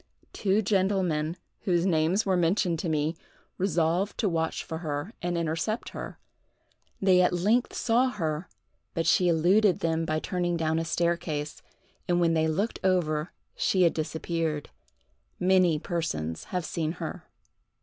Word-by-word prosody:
Two 205 +1 +1
gentlemen, 185 -5 +1 0.2
whose 175 -2 +1
names 175 +3 +2
were 190 -2 +2
mentioned 175 0 +1
to 170 - -2
me, 155 +1 0 0.4
resolved 180 +1 +1
to 220 - +1
watch 165 -3 -1
for 160 - -5
her 150 +5 -4
and 175 0 -1
intercept 165 +7 -2
her. - - -7 0.8
They 185 -2 +5
at 180 - +3
length 210 +8 +1
saw 245 +2 +2
her 165 -6 -3 0.5
but 165 -1 0
she 180 - +4
eluded 180 +4 +3
them 165 0 0
by 155 -1 0
turning 175 +1 -1
down 160 0 0
a 165 - -2
staircase, 165 -3 -1 0.5
and 175 -1 +2
when 170 -1 +3
they 160 -1 +2
looked 195 +9 -1
over 170 -4 +1 0.2
she 185 -2 +2
had 170 - +4
disappeared. 160 -1 -2 0.7
Many 180 -3 +4
persons 150 - -3
have 180 -3 -3
seen 160 -1 -2
her. - - -7
170 Hz, 145 wpm, -27 LUFS, 160-185 Hz, 0.8 s, They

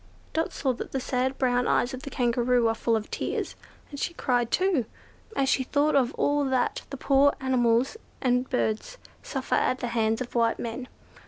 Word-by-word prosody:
Dot 320 +1 0
saw 265 -4 0
that 240 - -7
the 270 - 0
sad 260 +1 -1
brown 245 -1 +2
eyes 250 - +2
of 260 - -6
the 280 - -6
Kangaroo 245 -1 +2
were 225 - +3
full 230 0 0
of 215 -1 -3
tears, - - -3 0.4
and 285 - -7
she 340 - -2
cried 245 -5 +1
too, 365 - +2 0.5
as 275 - +1
she 265 - +3
thought 290 +3 +1
of 260 -2 +3
all 290 0 +2
that 260 -2 0
the 275 - -6
poor 280 +1 +4
animals 255 - +2 0.2
and 250 0 +1
birds 250 - -1 0.2
suffer - - -4
at 255 - +2
the 245 - -3
hands 225 -1 +1
of 250 -1 -5
white 230 -1 +2
men. 240 +2 -5
255 Hz, 190 wpm, -27 LUFS, 240-275 Hz, 0.5 s, poor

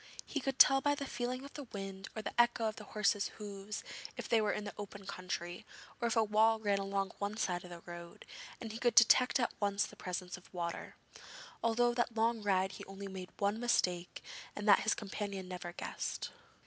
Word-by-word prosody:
He 290 - -2
could 270 -1 -2
tell 270 +1 +8
by 290 +1 +3
the 285 -1 -4
feeling 250 +1 -3
of 280 - -11
the 290 - -6
wind 195 -3 -6
or 220 - -4
the - - -4
echo 240 -1 +2
of 215 - -3
the 210 - -8
horses' 205 -1 +2
hoofs 205 0 -6 0.3
if - - -4
they 230 -2 +4
were 210 - +2
in 210 - -2
the 205 - -5
open 200 -1 -8
country, 180 -2 -4 0.4
or 235 - +2
if 230 - 0
a 225 - +5
wall 220 +1 +4
ran 205 -2 +2
along 195 0 -1
one 205 +1 -2
side 180 -6 0
of 180 - -10
the 175 -1 -9
road, 170 0 -9 0.3
and 225 -2 -5
he 225 - -6
could 240 -1 +2
detect 250 +3 +7
at 240 - +1
once 200 0 +2
the - - -11
presence 180 0 -4
of 180 - -17
water. 170 -2 -4 0.7
All 230 -1 +2
through 240 0 +4
that 240 -1 +1
long 225 0 +2
ride 190 -2 +2
he - - -8
only 195 +1 -7
made 190 -1 -7
one 205 +2 +1
mistake 180 -7 +1 0.3
and 205 +1 -4
that 200 - +8
his 220 - +2
companion 200 -2 -4
never 180 -1 -5
guessed. - - -4
205 Hz, 215 wpm, -35 LUFS, 190-230 Hz, 0.7 s, tell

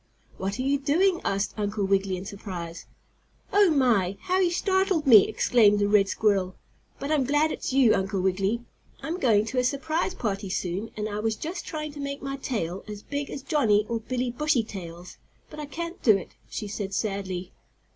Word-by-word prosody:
"What 195 +3 -2
are 255 - -2
you 280 +1 +1
doing?" 345 +6 +2
asked 195 +1 -1
Uncle 205 -1 -1
Wiggily 195 -1 +1
in 185 - -7
surprise. 180 -4 -7 0.7
"Oh, 405 -2 +6
my! 230 - +2
How 370 0 +1
you 365 -2 +3
startled 380 -2 +1
me!" 225 -7 +8
exclaimed 210 -4 +4
the 205 0 +2
red 205 -1 +4
squirrel. 195 -4 +1 0.4
"But 280 - -4
I'm 300 -3 +3
glad 295 +4 +2
it's - - -4
you, 260 -4 +5
Uncle 195 0 -1
Wiggily. 195 +5 0 0.4
I'm 340 +3 -3
going 215 - +3
to 255 +3 -1
a - - +2
surprise 315 +7 -1
party 200 - -3
soon, 185 +4 -3
and 210 0 -2
I 205 0 -4
was 220 0 0
just 330 - -6
trying 305 -1 -4
to 290 - -11
make 280 0 -5
my 275 0 -3
tail 195 -9 -3
as 210 -1 -8
big 285 0 -4
as 275 - -6
Johnnie 220 -11 +2
or 230 -1 -1
Billie 250 +2 -2
Bushytail's, 200 - -3 0.3
but 305 - -9
I 300 - -5
can't 335 +3 -6
do 215 -5 +5
it," 190 - -9 0.2
she 210 - -5
said 200 -1 -4
sadly. 190 -4 -3
225 Hz, 190 wpm, -26 LUFS, 195-285 Hz, 0.7 s, me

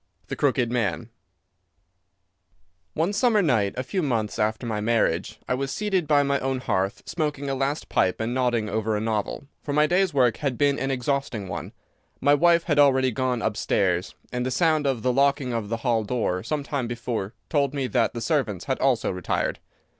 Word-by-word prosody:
The - - -3
Crooked 130 -4 +1
Man 115 -1 -1 1.8
One 170 +6 0
summer 215 -1 +3
night, 110 - +1
a 130 - -1
few 185 +8 -2
months 115 -8 -1
after 110 +3 0
my 110 -2 -2
marriage, 110 -2 0
I - - +1
was 135 +1 -2
seated 195 -6 -1
by 145 -1 +4
my 140 0 +1
own 130 0 -1
hearth 95 -2 -1
smoking 150 -4 -2
a - - 0
last 135 +3 -2
pipe 90 -1 +1
and 115 +2 -2
nodding 120 -4 +1
over 110 +1 -1
a - - -1
novel, 110 +4 -2 0.2
for 145 - -4
my 150 +1 +4
day's 180 +3 +2
work 125 -5 +3
had 140 -5 -2
been 145 -1 +2
an 135 - -1
exhausting 130 -5 -2
one. - - -5 0.5
My 145 - +4
wife 170 +3 +4
had 150 -4 +1
already 130 -2 +4
gone 125 -1 -1
upstairs, 95 -4 0 0.2
and 125 0 -1
the 130 - -1
sound 155 +2 +2
of 130 -5 -1
the 125 -1 +2
locking 140 -1 +2
of 110 -3 -3
the 115 - -1
hall 115 -3 +2
door 100 -5 -1
some 145 +7 -2
time 140 -4 -2
before 115 -3 -4
told 140 -2 0
me 135 -2 -1
that 120 -2 +1
the 115 - -4
servants 115 - -1
had 130 - -1
also 130 -4 +2
retired. 90 -2 -2
130 Hz, 190 wpm, -25 LUFS, 110-145 Hz, 1.8 s, by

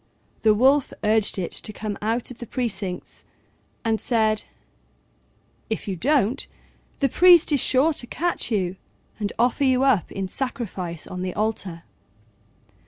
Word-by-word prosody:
The 215 -1 +4
Wolf 270 +5 +3
urged 215 -1 +2
it 180 -3 -3
to - - -5
come 210 0 -5
out 225 +4 -1
of 245 - -10
the 240 - -7
precincts, 200 -8 -4 0.6
and 225 -1 +1
said, 220 -3 +1 1.3
"If 220 - -3
you 195 - -2
don't, 265 - +1 0.5
the 275 - +2
priest 345 +3 +6
is 285 - +3
sure 275 +6 +4
to 240 - -2
catch 345 +3 0
you 190 -3 -1 0.4
and 205 -1 -2
offer 245 +4 +2
you 260 -1 +3
up 255 - +2
in 195 -1 -3
sacrifice 190 - -4
on 180 - -6
the 185 -1 -4
altar." 200 -6 -2
220 Hz, 145 wpm, -24 LUFS, 200-260 Hz, 1.3 s, priest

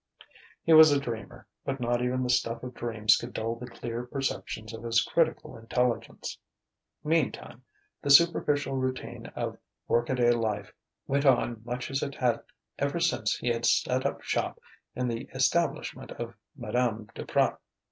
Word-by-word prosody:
He 165 - +4
was 155 -1 +10
a 145 - +4
dreamer, 115 -5 -6 0.2
but 135 0 -3
not 120 0 0
even 125 +1 0
the 125 - -2
stuff 115 -1 0
of 125 0 -6
dreams 110 -2 +3
could 120 - -6
dull 115 +1 -2
the 125 +1 -8
clear 115 0 -5
perceptions 125 -4 -4
of 115 - -7
his 115 0 +2
critical 160 0 0
intelligence.... 120 +1 -2 0.6
Meantime, 150 -5 -1 0.4
the 145 - -3
superficial 145 -2 +5
routine 130 -3 -3
of - - -3 0.3
work 120 0 +2
a 130 - +1
day 120 -1 +4
life 110 -4 -1 0.3
went 140 +1 +1
on 120 -3 +3
much 125 +2 -4
as 135 - 0
it 140 -1 -3
had 125 -3 +1 0.4
ever - - 0
since - - +1
he 120 - -2
had 115 0 -1
set - - +2
up - - -5
shop - - -1 0.4
in 125 0 -1
the 115 -1 -4
establishment - - 0
of 120 0 -6 0.2
Madame 120 -3 -1
Duprat. - - 0
120 Hz, 160 wpm, -28 LUFS, 115-135 Hz, 0.6 s, was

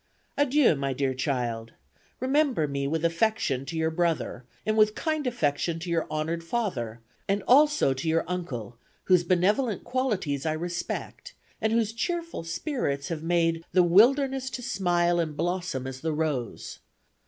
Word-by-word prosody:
"Adieu, 285 - +4
my 135 -1 -2
dear 135 0 0
child 120 -4 -2 0.5
remember 260 - +2
me 140 -1 -2
with 160 +3 -1
affection 165 - 0
to 165 - -4
your 160 0 +1
brother 165 -6 -1 0.2
and 215 - +1
with 215 -1 +4
kind 310 -4 -1
affection 165 -7 0
to 170 +1 -5
your 165 -1 0
honored 155 +2 -2
father 140 - -3 0.3
and 200 0 0
also 295 - +5
to 145 +5 -3
your 165 +1 +2
uncle 125 - -5 0.2
whose 180 -2 +4
benevolent 195 +6 +1
qualities 200 - -1
I 155 - 0
respect 175 +2 -5 0.3
and 220 - +1
whose 225 -1 +1
cheerful 335 - -3
spirits 165 - -2
have 165 -3 -3
made 165 0 +1
'the 185 - +6
wilderness 260 +8 +4
to 250 - -6
smile 175 -6 +1
and 155 -3 -2
blossom 175 -5 -2
as 130 0 -6
the 160 0 -1
rose.' 150 -7 -3
170 Hz, 155 wpm, -27 LUFS, 150-220 Hz, 0.5 s, the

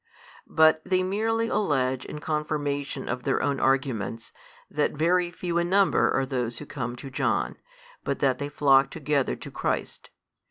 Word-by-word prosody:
but 160 0 +4
they 185 0 +1
merely 225 +4 0
allege 130 - 0
in - - -7
confirmation 145 -3 -2
of 125 0 -2
their 135 +1 0
own 140 -1 0
arguments, 130 -5 -1 0.3
that - - 0
very 175 +3 +2
few 175 0 -2
in 170 0 -1
number 195 +1 +4
are 135 - +1
those 125 -3 -2
who - - -7
come 120 -4 -4
to 135 +2 -9
John, - - 0 0.5
but 140 - -1
that 130 -2 +1
they 145 0 -3
flock 135 -2 +4
together 150 -3 0
to - - -10
Christ. - - -3
145 Hz, 160 wpm, -26 LUFS, 130-170 Hz, 0.5 s, but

